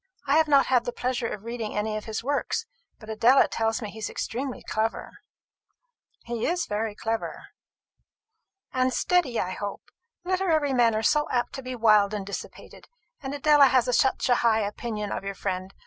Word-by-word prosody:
I 280 Hz, +1 st, +2 dB
have 320 Hz, -1 st, +4 dB
not 280 Hz, -2 st, +5 dB
had 250 Hz, -2 st, +2 dB
the 245 Hz, -, -2 dB
pleasure 250 Hz, -1 st, -2 dB
of 210 Hz, -2 st, -6 dB
reading 230 Hz, -2 st, -5 dB
any 215 Hz, +1 st, -1 dB
of 215 Hz, -, -5 dB
his 220 Hz, 0 st, -4 dB
works; 285 Hz, -, -1 dB, 0.3 s
but 215 Hz, -, -14 dB
Adela 230 Hz, +5 st, +4 dB
tells 225 Hz, +1 st, -1 dB
me 210 Hz, -, -5 dB
he 220 Hz, -, -10 dB
is 215 Hz, -, -3 dB
extremely 255 Hz, +2 st, -4 dB
clever." 220 Hz, +1 st, -3 dB, 1.0 s
"He 235 Hz, -1 st, -3 dB
is 345 Hz, 0 st, 0 dB
very 210 Hz, 0 st, -3 dB
clever." 225 Hz, +1 st, -4 dB, 1.2 s
"And 255 Hz, 0 st, +2 dB
steady, 325 Hz, -10 st, +1 dB
I 185 Hz, -, -2 dB
hope. 200 Hz, +2 st, -6 dB, 0.3 s
Literary 340 Hz, -6 st, +1 dB
men 235 Hz, -3 st, +3 dB
are 220 Hz, -, -1 dB
so 300 Hz, +5 st, +2 dB
apt 245 Hz, -1 st, -1 dB
to 270 Hz, -, -6 dB
be 255 Hz, 0 st, -6 dB
wild 215 Hz, -3 st, +4 dB
and 200 Hz, -2 st, -4 dB
dissipated; 200 Hz, -, -9 dB, 0.3 s
and 275 Hz, 0 st, -4 dB
Adela 290 Hz, -1 st, +6 dB
has 250 Hz, -2 st, +2 dB
such 265 Hz, -2 st, +2 dB
a 245 Hz, -, +4 dB
high 225 Hz, -2 st, +3 dB
opinion 210 Hz, 0 st, -4 dB
of -, -, -3 dB
your 195 Hz, 0 st, -5 dB
friend. 185 Hz, -1 st, -4 dB
235 Hz, 180 wpm, -26 LUFS, 215-270 Hz, 1.2 s, Adela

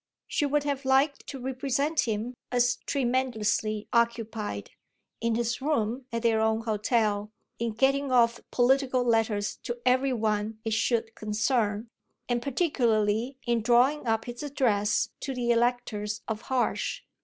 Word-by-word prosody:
She 290 Hz, -, 0 dB
would 290 Hz, +1 st, +1 dB
have 285 Hz, -1 st, -2 dB
liked 270 Hz, +2 st, +2 dB
to 270 Hz, -, -6 dB
represent 270 Hz, +3 st, 0 dB
him 225 Hz, +3 st, -2 dB, 0.2 s
as 245 Hz, -1 st, +2 dB
tremendously 235 Hz, -5 st, 0 dB
occupied, 225 Hz, -, -1 dB, 0.5 s
in 230 Hz, 0 st, 0 dB
his 235 Hz, +2 st, -1 dB
room 255 Hz, -3 st, -1 dB
at 230 Hz, 0 st, -3 dB
their 225 Hz, -1 st, +3 dB
own 220 Hz, 0 st, +2 dB
hotel, 215 Hz, -1 st, 0 dB, 0.3 s
in 230 Hz, -1 st, -1 dB
getting 275 Hz, +3 st, +2 dB
off 235 Hz, -1 st, +4 dB
political 255 Hz, 0 st, +2 dB
letters 225 Hz, -3 st, +1 dB
to 240 Hz, -, -5 dB
every 260 Hz, +2 st, +3 dB
one 215 Hz, -2 st, -1 dB
it 225 Hz, -, 0 dB
should 225 Hz, 0 st, 0 dB
concern, 215 Hz, 0 st, 0 dB, 0.4 s
and 240 Hz, -1 st, 0 dB
particularly 240 Hz, -, +1 dB
in 235 Hz, -1 st, +1 dB
drawing 250 Hz, +5 st, +3 dB
up 225 Hz, 0 st, +1 dB
his 240 Hz, 0 st, -7 dB
address 225 Hz, -8 st, +1 dB
to 270 Hz, -1 st, -4 dB
the 240 Hz, -1 st, +1 dB
electors 230 Hz, -3 st, 0 dB
of 220 Hz, -1 st, -3 dB
Harsh. 260 Hz, -2 st, 0 dB
235 Hz, 140 wpm, -28 LUFS, 220-260 Hz, 0.5 s, off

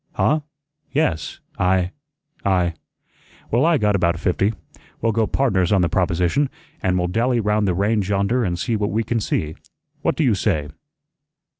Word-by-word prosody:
"Huh? 155 Hz, -, +2 dB, 0.5 s
Yes 115 Hz, -, -1 dB, 0.2 s
I 90 Hz, 0 st, +2 dB, 0.5 s
I 90 Hz, -3 st, +2 dB, 0.4 s
" -, -, -29 dB
"Well, 125 Hz, +8 st, +3 dB
I 170 Hz, -2 st, +4 dB
got 105 Hz, -3 st, +2 dB
about 85 Hz, -2 st, +1 dB
fifty. 95 Hz, +3 st, +1 dB, 0.5 s
We'll 115 Hz, -, +1 dB
go 110 Hz, 0 st, +1 dB
pardners 95 Hz, -10 st, +1 dB
on 95 Hz, -3 st, +4 dB
the 85 Hz, -, +1 dB
proposition, 90 Hz, -, +1 dB, 0.3 s
an' 90 Hz, -1 st, +1 dB
we'll 90 Hz, -, +1 dB
dally 120 Hz, +6 st, +1 dB
'round 105 Hz, -1 st, +1 dB
the 90 Hz, -, +1 dB
range 100 Hz, 0 st, +1 dB
yonder 100 Hz, +5 st, +1 dB
an' 90 Hz, -4 st, 0 dB
see 110 Hz, +6 st, -1 dB
what 105 Hz, -1 st, 0 dB
we 115 Hz, +2 st, 0 dB
can 115 Hz, +1 st, -1 dB
see. 80 Hz, -7 st, -1 dB, 0.5 s
What -, -, +1 dB
do -, -, +1 dB
you -, -, +4 dB
say?" 75 Hz, -1 st, 0 dB
100 Hz, 170 wpm, -21 LUFS, 90-115 Hz, 0.5 s, I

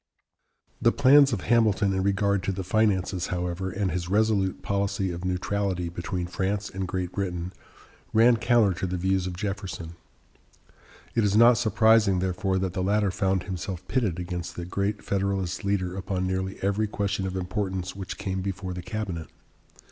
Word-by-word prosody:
The 115 Hz, -, +5 dB
plans 140 Hz, +1 st, +6 dB
of 105 Hz, -6 st, -1 dB
Hamilton 110 Hz, -4 st, +3 dB
in 95 Hz, -, 0 dB
regard 100 Hz, 0 st, +1 dB
to -, -, +1 dB
the 95 Hz, 0 st, -4 dB
finances, 95 Hz, -2 st, +1 dB
however, 90 Hz, +1 st, -2 dB
and 95 Hz, 0 st, -1 dB
his 90 Hz, -1 st, -3 dB
resolute 100 Hz, -2 st, +1 dB
policy 100 Hz, -1 st, -1 dB
of 85 Hz, +1 st, -6 dB
neutrality 90 Hz, -1 st, -1 dB
between 85 Hz, +1 st, -4 dB
France 95 Hz, +3 st, -2 dB
and 95 Hz, -1 st, -3 dB
Great 90 Hz, -1 st, -3 dB
Britain, 90 Hz, -2 st, -3 dB, 0.6 s
ran 115 Hz, +2 st, +5 dB
counter 115 Hz, -3 st, +3 dB
to 95 Hz, -, -1 dB
the 90 Hz, 0 st, -2 dB
views 95 Hz, +1 st, 0 dB
of 90 Hz, -1 st, -5 dB
Jefferson. 95 Hz, -5 st, -4 dB, 1.2 s
It 115 Hz, -, +2 dB
is 100 Hz, 0 st, +2 dB
not 120 Hz, +1 st, +7 dB
surprising, 110 Hz, -3 st, +4 dB
therefore, 95 Hz, +1 st, 0 dB
that 95 Hz, -1 st, -1 dB
the 95 Hz, -, -2 dB
latter 100 Hz, +1 st, +2 dB
found 95 Hz, -1 st, 0 dB
himself 95 Hz, -1 st, -5 dB
pitted 110 Hz, -10 st, 0 dB
against 90 Hz, -1 st, -5 dB
the 85 Hz, -, -5 dB
great 100 Hz, +3 st, -2 dB
Federalist 95 Hz, -2 st, -1 dB
leader 95 Hz, -2 st, -1 dB
upon 95 Hz, -1 st, -2 dB
nearly 95 Hz, +1 st, -2 dB
every 100 Hz, +2 st, +1 dB
question 100 Hz, -2 st, -2 dB
of 95 Hz, -, -4 dB
importance 95 Hz, 0 st, -3 dB
which 95 Hz, -2 st, -6 dB
came 95 Hz, -2 st, -3 dB
before 95 Hz, -1 st, -4 dB
the 90 Hz, -, -5 dB
cabinet. 90 Hz, -7 st, -4 dB
95 Hz, 165 wpm, -26 LUFS, 90-105 Hz, 1.2 s, not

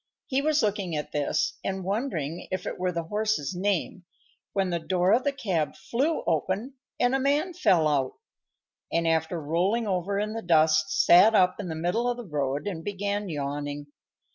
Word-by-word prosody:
He 265 Hz, +1 st, 0 dB
was 305 Hz, 0 st, +2 dB
looking 200 Hz, -5 st, -1 dB
at 150 Hz, 0 st, -4 dB
this, 145 Hz, -1 st, -1 dB
and 190 Hz, -1 st, -3 dB
wondering 180 Hz, -, -3 dB
if 185 Hz, -1 st, -3 dB
it -, -, -5 dB
were 180 Hz, 0 st, 0 dB
the 170 Hz, -1 st, -3 dB
horse's 210 Hz, -3 st, -1 dB
name, 185 Hz, -1 st, -1 dB, 0.5 s
when 190 Hz, -2 st, 0 dB
the 170 Hz, -, 0 dB
door 180 Hz, +3 st, +2 dB
of 245 Hz, +3 st, +3 dB
the 285 Hz, -, +1 dB
cab 185 Hz, -, -2 dB
flew 270 Hz, +11 st, -1 dB
open 190 Hz, -, -1 dB, 0.3 s
and 245 Hz, +1 st, +3 dB
a 270 Hz, -, +2 dB
man 290 Hz, +7 st, +1 dB
fell 190 Hz, -, +3 dB
out, 135 Hz, -3 st, 0 dB, 0.8 s
and, 165 Hz, 0 st, +1 dB
after 160 Hz, +1 st, +1 dB
rolling 180 Hz, +10 st, 0 dB
over 195 Hz, 0 st, -1 dB
in 210 Hz, +1 st, -1 dB
the 225 Hz, -, -4 dB
dust, 155 Hz, -3 st, +3 dB, 0.2 s
sat 205 Hz, +6 st, +7 dB
up 185 Hz, -1 st, +3 dB
in 200 Hz, -, -4 dB
the 160 Hz, -, -4 dB
middle 180 Hz, +10 st, 0 dB
of 245 Hz, -, -2 dB
the 240 Hz, -, -7 dB
road 145 Hz, -3 st, -2 dB
and 175 Hz, -5 st, -4 dB
began 205 Hz, +1 st, -2 dB
yawning. 145 Hz, -1 st, -4 dB
185 Hz, 185 wpm, -27 LUFS, 160-215 Hz, 0.8 s, sat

